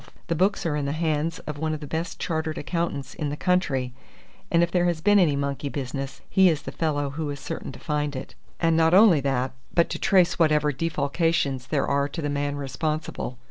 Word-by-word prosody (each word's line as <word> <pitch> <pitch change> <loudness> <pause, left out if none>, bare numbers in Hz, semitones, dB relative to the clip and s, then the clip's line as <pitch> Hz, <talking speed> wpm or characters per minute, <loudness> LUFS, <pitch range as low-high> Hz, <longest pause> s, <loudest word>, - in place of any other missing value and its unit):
The 170 - +1
books 190 +4 +1
are 155 -3 0
in 145 -1 -1
the 140 - -1
hands 160 0 0
of 150 -1 -5
one 155 0 -1
of - - -7
the 150 - -7
best 160 +3 -4
chartered 160 -2 -2
accountants 155 -4 -3
in 150 -3 -3
the 145 - -4
country, 140 -9 0 0.6
and 170 0 +4
if 170 - 0
there 175 -1 +2
has 170 -2 +1
been 205 +4 +4
any 160 -6 +4
monkey 140 0 -2
business, 135 0 -5
he 190 -2 +5
is 155 -3 -1
the - - -6
fellow 145 -3 -1
who 150 +1 -3
is 140 -1 -5
certain - - -5
to 130 - -11
find 150 -2 -2
it; 130 - -6 0.3
and 165 -1 +3
not 165 +1 +4
only 195 -6 +7
that, 135 -2 0 0.2
but 170 - +2
to - - -3
trace 180 -3 +3
whatever 150 -2 +3
defalcations 145 -2 0
there 145 -3 +1
are 140 0 +1
to 165 - -5
the 145 - -1
man 145 0 -1
responsible. 145 0 -3
150 Hz, 220 wpm, -25 LUFS, 140-165 Hz, 0.6 s, only